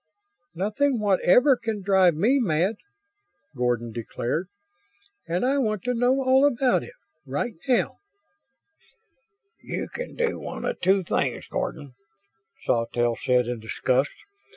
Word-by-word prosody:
"Nothing 225 +8 0
whatever 210 +7 +4
can 225 -4 -4
drive 190 -4 +4
me 235 - +3
mad," 190 0 +1 0.8
Gordon 120 -2 -1
declared, 120 - -3 0.8
"and 175 +7 0
I 275 +2 +2
want 215 -6 -1
to 250 - 0
know 250 +3 +2
all 260 +1 +4
about 260 -2 +3
it - - -11 0.3
right 145 - -3
now!" 250 -2 +1 1.6
"You - - -4
can - - -7
do 475 -1 -1
one - - -6
of - - -3
two 190 0 +3
things, - - -1
Gordon," 140 -3 -4 0.7
Sawtelle 120 0 +1
said 125 -1 +3
in 120 -1 -3
disgust. 125 +5 0
195 Hz, 125 wpm, -25 LUFS, -, 1.6 s, whatever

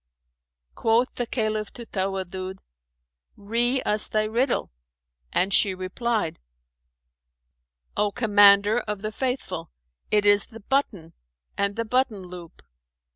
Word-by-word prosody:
Quoth 230 +3 +1
the 245 - -3
Caliph 215 -3 -2
to 235 - -9
Tawaddud, 190 -2 -4 0.8
"Ree 240 +5 +1
us 210 0 +1
thy 215 0 0
riddle," 235 - 0 0.6
and 190 +2 +1
she 195 -1 +4
replied, 185 0 -2 1.6
"O 210 -1 +1
Commander 205 -1 +5
of 210 -3 -5
the 215 - -2
Faithful, 215 -10 -3 0.4
it 210 -1 +2
is 205 0 +5
the 225 - -12
button 200 - -2 0.4
and 200 0 -1
the 230 - -2
button 225 -4 0
loop. 175 -2 -11
210 Hz, 115 wpm, -25 LUFS, 195-230 Hz, 1.6 s, Commander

